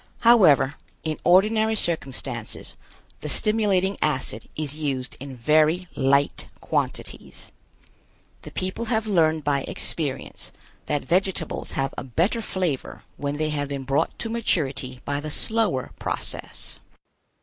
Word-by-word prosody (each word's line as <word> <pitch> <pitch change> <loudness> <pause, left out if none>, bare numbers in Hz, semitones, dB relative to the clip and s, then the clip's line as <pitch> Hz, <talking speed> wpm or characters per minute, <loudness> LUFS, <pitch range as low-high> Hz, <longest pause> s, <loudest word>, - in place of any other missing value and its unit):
However, 180 - +6 0.3
in 155 -1 -2
ordinary 215 +5 +5
circumstances, 135 - -2 0.4
the 150 - -5
stimulating 200 -1 +2
acid 130 -7 -1
is 150 -2 -2
used 140 -4 -2
in 135 -1 -7
very 155 +7 +3
light 140 +1 +2
quantities. - - -3 0.9
The - - -9
people 185 +5 -3
have 220 -1 +1
learned 160 -6 +3
by 140 -1 +2
experience 145 -5 -2 0.4
that 145 -2 0
vegetables 185 0 0
have 135 0 -1
a - - -5
better 170 - +1
flavor 180 - -2
when 145 0 -2
they 155 0 0
have 145 -1 -1
been 140 -1 -4
brought 140 +4 0
to 225 - -3
maturity 135 - 0
by 145 0 -1
the 155 +1 -5
slower 215 - 0
processes. - - -5
155 Hz, 125 wpm, -25 LUFS, 140-190 Hz, 0.9 s, However